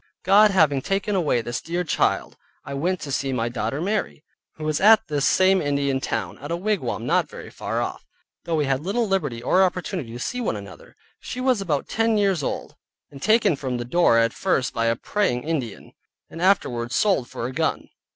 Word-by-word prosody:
God 205 Hz, +3 st, +6 dB
having 155 Hz, -8 st, +3 dB
taken 195 Hz, +6 st, -1 dB
away 150 Hz, -11 st, +1 dB
this 120 Hz, 0 st, -4 dB
dear 175 Hz, +2 st, -2 dB
child, 165 Hz, -, 0 dB, 0.3 s
I 140 Hz, -, -6 dB
went 175 Hz, +6 st, -1 dB
to 145 Hz, -, -6 dB
see 135 Hz, 0 st, -1 dB
my 120 Hz, -2 st, -1 dB
daughter 120 Hz, +3 st, -3 dB
Mary, 195 Hz, -3 st, -2 dB, 0.3 s
who 155 Hz, -, -9 dB
was 155 Hz, -1 st, -1 dB
at 220 Hz, +1 st, +6 dB
this 145 Hz, -1 st, +1 dB
same 190 Hz, 0 st, +4 dB
Indian 140 Hz, -2 st, 0 dB
town, -, -, -3 dB
at 145 Hz, -, -8 dB
a 170 Hz, -, 0 dB
wigwam 190 Hz, -, -2 dB
not -, -, +1 dB
very -, -, -10 dB
far -, -, -3 dB
off, -, -, -6 dB, 0.4 s
though 170 Hz, -, -1 dB
we 150 Hz, -2 st, +1 dB
had 135 Hz, -1 st, 0 dB
little 215 Hz, +7 st, -1 dB
liberty 145 Hz, -12 st, -1 dB
or 185 Hz, -, +3 dB
opportunity 180 Hz, -, -2 dB
to 120 Hz, -, -7 dB
see 250 Hz, -, -3 dB
one 220 Hz, -, -1 dB
another. 100 Hz, -4 st, -11 dB, 0.2 s
She 250 Hz, -, -7 dB
was 255 Hz, -4 st, +2 dB
about 155 Hz, -7 st, -1 dB
ten 225 Hz, 0 st, +1 dB
years 195 Hz, -5 st, +2 dB
old, -, -, -4 dB, 0.4 s
and 140 Hz, -1 st, -12 dB
taken 215 Hz, -4 st, +3 dB
from 130 Hz, -3 st, -3 dB
the 120 Hz, -, -4 dB
door 125 Hz, -2 st, +3 dB
at 115 Hz, 0 st, +2 dB
first 180 Hz, -9 st, 0 dB
by 115 Hz, 0 st, 0 dB
a 115 Hz, -, +2 dB
Praying 125 Hz, -, -1 dB
Ind. 145 Hz, -9 st, -4 dB, 0.4 s
and 165 Hz, -, -8 dB
afterward 125 Hz, -11 st, +1 dB
sold 190 Hz, -, +1 dB
for 115 Hz, -, -5 dB
a 125 Hz, -, -3 dB
gun. -, -, -1 dB
155 Hz, 205 wpm, -23 LUFS, 130-195 Hz, 0.4 s, God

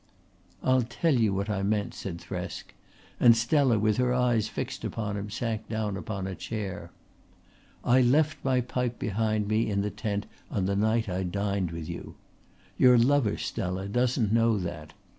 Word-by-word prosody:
"I'll 130 Hz, 0 st, +4 dB
tell 125 Hz, +7 st, 0 dB
you 115 Hz, -5 st, +3 dB
what 100 Hz, +1 st, -1 dB
I 105 Hz, -2 st, -1 dB
meant," 105 Hz, +1 st, 0 dB
said 90 Hz, -4 st, -6 dB
Thresk, -, -, -6 dB, 0.5 s
and 115 Hz, -1 st, +7 dB
Stella 125 Hz, 0 st, +3 dB
with 105 Hz, +1 st, +2 dB
her 125 Hz, 0 st, +2 dB
eyes 120 Hz, -4 st, +2 dB
fixed -, -, -5 dB
upon 105 Hz, -3 st, -3 dB
him 100 Hz, +1 st, -4 dB
sank 110 Hz, 0 st, -3 dB
down 110 Hz, -2 st, -2 dB
upon 100 Hz, -1 st, -4 dB
a 95 Hz, -, -4 dB
chair. 100 Hz, -1 st, -5 dB, 0.9 s
"I 125 Hz, +2 st, +4 dB
left 150 Hz, +5 st, +2 dB
my 130 Hz, -1 st, +2 dB
pipe 125 Hz, 0 st, -2 dB
behind 110 Hz, 0 st, 0 dB
me 110 Hz, +1 st, +1 dB
in 100 Hz, -1 st, 0 dB
the 105 Hz, -, -2 dB
tent 105 Hz, -1 st, -3 dB, 0.2 s
on 95 Hz, -, -1 dB
the 100 Hz, +1 st, 0 dB
night 110 Hz, +2 st, +1 dB
I 95 Hz, 0 st, -2 dB
dined 100 Hz, 0 st, -1 dB
with 80 Hz, -1 st, -6 dB
you. -, -, -7 dB, 0.6 s
Your 125 Hz, -1 st, +7 dB
lover, 125 Hz, -2 st, +3 dB
Stella, 95 Hz, +2 st, -3 dB
doesn't 120 Hz, -1 st, +1 dB
know 115 Hz, -1 st, +3 dB
that. 85 Hz, -4 st, -5 dB
110 Hz, 170 wpm, -28 LUFS, 100-120 Hz, 0.9 s, and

